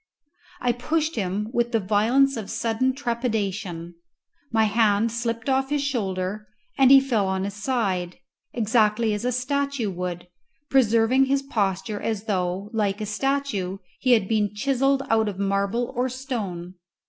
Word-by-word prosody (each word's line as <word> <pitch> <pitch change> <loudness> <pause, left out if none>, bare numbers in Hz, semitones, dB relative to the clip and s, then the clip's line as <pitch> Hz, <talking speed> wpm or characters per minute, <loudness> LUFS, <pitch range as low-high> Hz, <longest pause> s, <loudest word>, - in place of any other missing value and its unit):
I 245 - +2
pushed 310 +6 -1
him 205 0 -2
with 240 -1 0
the 225 - +3
violence 230 +8 +3
of 220 -3 -6
sudden 230 +3 0
trepidation; 205 - -3 0.6
my 220 -1 +3
hand 220 0 +2
slipped 230 0 -3
off 270 0 +1
his 290 -1 0
shoulder, 210 -5 -2 0.3
and 265 -2 +5
he 270 0 +9
fell 235 -7 0
on 190 0 -1
his 200 0 -3
side, 195 -6 -2 0.3
exactly 220 -1 +2
as 210 +3 -3
a 250 - +1
statue 265 -2 -1
would, 180 -1 -5 0.4
preserving 250 0 +4
his 275 +1 0
posture 210 -4 -2
as 220 -3 -2
though, 190 -1 -2
like 205 -2 0
a 215 - -3
statue, 210 -4 -1 0.2
he 255 -2 +4
had 220 -5 +3
been 210 -2 0
chiselled 270 +4 +1
out 220 -3 +2
of 195 - -7
marble 200 +4 -1
or 250 +2 0
stone. 215 -10 -5
225 Hz, 150 wpm, -24 LUFS, 200-255 Hz, 0.6 s, he